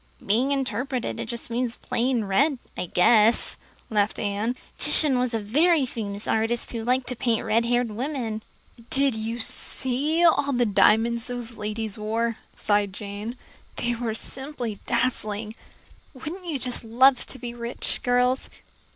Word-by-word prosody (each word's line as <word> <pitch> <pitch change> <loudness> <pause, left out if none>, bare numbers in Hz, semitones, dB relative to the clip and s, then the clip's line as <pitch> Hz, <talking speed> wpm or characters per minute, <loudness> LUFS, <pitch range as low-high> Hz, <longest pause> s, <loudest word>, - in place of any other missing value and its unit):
"Being 245 +7 +2
interpreted 265 -2 -2
it 235 -1 -5
means 240 0 -1
plain 245 -1 0
red, 265 +9 +2 0.2
I 180 - -4
guess," 215 +6 +4 0.4
laughed 210 -1 +1
Anne. 210 +4 -1 0.2
"Titian 275 -5 +6
was 250 -2 0
a - - 0
very 295 - +3
famous 210 -4 -5
artist 225 +2 0
who 230 -2 -4
liked 250 +2 +1
to 250 - -3
paint 230 -1 0
red 225 +1 +2
haired 240 -1 +1
women." 235 -2 -3 0.5
"Did 275 -1 +2
you 220 +1 -3
see 270 +7 +1
all 285 -4 +3
the 245 -1 +2
diamonds 225 +2 +3
those 245 -1 -4
ladies 215 0 -3
wore?" 225 +2 -1 0.2
sighed 205 -2 +1
Jane. 210 +4 -6 0.4
"They 240 0 0
were 230 -2 -3
simply 255 -4 -5
dazzling. 220 -3 -1 0.6
Wouldn't 340 +8 -7
you 310 -4 -1
just 250 -2 -2
love 255 +3 +4
to - - -9
be 240 0 -6
rich, 235 0 -4
girls?" 250 +1 +1
235 Hz, 145 wpm, -25 LUFS, 220-255 Hz, 0.6 s, Titian